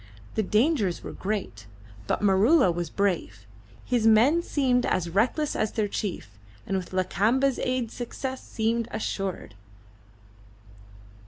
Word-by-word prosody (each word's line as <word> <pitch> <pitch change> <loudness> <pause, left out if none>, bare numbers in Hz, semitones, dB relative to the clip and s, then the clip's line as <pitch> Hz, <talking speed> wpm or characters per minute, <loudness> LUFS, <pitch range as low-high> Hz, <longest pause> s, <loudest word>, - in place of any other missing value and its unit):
The - - +1
dangers 215 - +1
were - - -6
great, 190 - -4 0.4
but - - -1
Maroola 205 - +5
was 170 -1 -3
brave; 180 - -2 0.4
his 240 -3 +1
men 245 +10 +5
seemed 255 -6 +1
as 170 -2 -1
reckless 250 - +1
as 215 - -1
their 215 -2 0
chief, 170 - -5 0.3
and 195 - -2
with 185 -2 -4
Lakamba's 215 +9 +1
aid 255 -3 -1
success 260 +2 -5
seemed 230 +1 -1
assured. 195 - -4
215 Hz, 120 wpm, -26 LUFS, 190-250 Hz, 0.4 s, Maroola